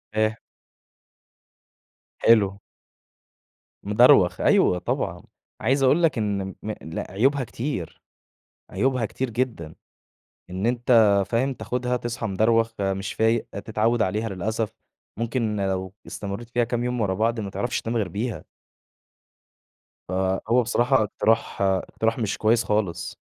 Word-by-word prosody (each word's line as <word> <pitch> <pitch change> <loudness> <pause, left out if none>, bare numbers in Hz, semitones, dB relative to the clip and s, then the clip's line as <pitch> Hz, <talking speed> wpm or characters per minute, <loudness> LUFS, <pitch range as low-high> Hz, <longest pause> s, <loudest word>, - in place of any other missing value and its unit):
إيه؟ 110 +1 +1 1.8
حلو. 100 -3 +4 1.2
مدروخ، 105 -3 +5
أيوه 90 - +4
طبعًا. - - -3 0.4
عايِز 135 +1 +2
أقول 145 +6 +4
لك 155 -6 +3
إن 100 -3 -2
م 110 - -3
لأ، 80 +1 -6
عيوبها 135 +7 +2
كتير، 120 - -5 0.7
عيوبها 130 -3 +1
كتير 130 +4 -3
جدًا. 115 -10 -3 0.8
إن 95 +4 -2
أنتَ، 115 -4 +4
فاهم، 130 +4 0
تاخُدها 125 +2 -2
تصحى 120 -1 -4
مدروخ 115 +3 +2
مش 95 0 -2
فايِق، 110 +1 +1
تتعوَّد 110 +3 0
عليها، 110 +3 -1
للأسف. 105 +3 -2 0.5
ممكن 115 -2 -1
لو 95 -1 -2
استمرِّيت 100 +3 -6
فيها 120 0 +1
كام 120 +1 -2
يوم 125 0 -2
ورا 100 -3 +1
بعض، 115 +3 0
ما 100 -2 -5
تعرَفش 120 +5 -2
تنام 115 +1 -3
غير 105 -4 0
بيها. 110 +6 -4 1.7
فهو 95 +6 +1
بصراحة 120 +1 +2
إقتراح 110 +1 0
إقتراح 100 +4 0
مش 105 -4 -1
كويس 110 +3 +3
خالص. 105 -5 -2
110 Hz, 120 wpm, -24 LUFS, 100-120 Hz, 1.8 s, مدروخ